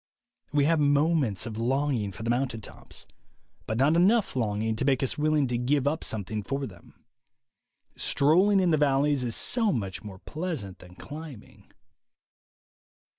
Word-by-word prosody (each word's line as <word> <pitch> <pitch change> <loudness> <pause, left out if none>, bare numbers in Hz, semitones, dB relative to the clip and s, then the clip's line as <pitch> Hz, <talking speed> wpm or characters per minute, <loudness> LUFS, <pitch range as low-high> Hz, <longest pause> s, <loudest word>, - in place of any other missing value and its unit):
We 145 -1 +2
have 165 +1 +3
moments 145 - +2
of 110 -1 -6
longing 125 -3 0
for 95 +3 -9
the 115 - 0
mountain 125 -2 -1
tops, - - -12 0.6
but 110 - -2
not 140 +6 +3
enough 200 - +3
longing 110 -2 -1
to 130 - -1
make 135 -1 +2
us 130 - -1
willing 150 -1 +2
to 120 -1 -1
give 140 +2 +1
up 155 +3 -1
something 105 0 -3
for 135 +6 -3
them. 90 0 -15 0.9
Strolling 185 +8 +3
in 180 -2 +2
the 155 - +3
valleys 140 -1 +2
is 120 -2 -2
so 225 -4 +1
much 100 - -4
more 100 -3 -9
pleasant 150 - -5
than 90 0 -15
climbing. 145 -2 -11
135 Hz, 155 wpm, -27 LUFS, 110-155 Hz, 0.9 s, have